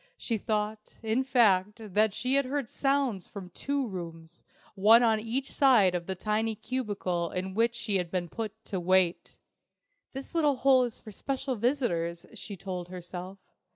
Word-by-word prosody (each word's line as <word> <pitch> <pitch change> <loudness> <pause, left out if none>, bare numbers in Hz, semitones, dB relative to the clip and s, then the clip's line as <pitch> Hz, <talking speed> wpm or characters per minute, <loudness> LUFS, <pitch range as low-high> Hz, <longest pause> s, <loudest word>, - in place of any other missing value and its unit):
She 230 -3 -2
thought, 215 0 -3
in 225 +4 +1
fact, 210 -7 +3 0.2
that 210 0 +3
she 255 +2 0
heard 275 -1 0
sounds 270 -9 0
from 190 -3 -9
two 280 +7 -2
rooms, 170 -4 -8 0.3
one 220 +4 +6
on 220 -2 +3
each 235 +5 -3
side 235 -10 +5
of 175 -1 -3
the 190 - -2
tiny 215 +3 -1
cubicle 200 -9 -2
in 185 +1 -4
which 230 +3 +2
she 215 -4 0
had 180 -2 -2
been 175 -1 -2
put 220 +3 -6
to 190 - -3
wait. 180 0 +1 0.8
"This 270 +4 -7
little 300 -4 +3
hole 260 -1 +4
is 235 - -7
for 215 - -11
special 270 +4 -3
visitors," 205 -9 -1
she 205 -2 -8
told 180 -1 -5
herself. 180 +1 -7
215 Hz, 160 wpm, -29 LUFS, 185-250 Hz, 0.8 s, one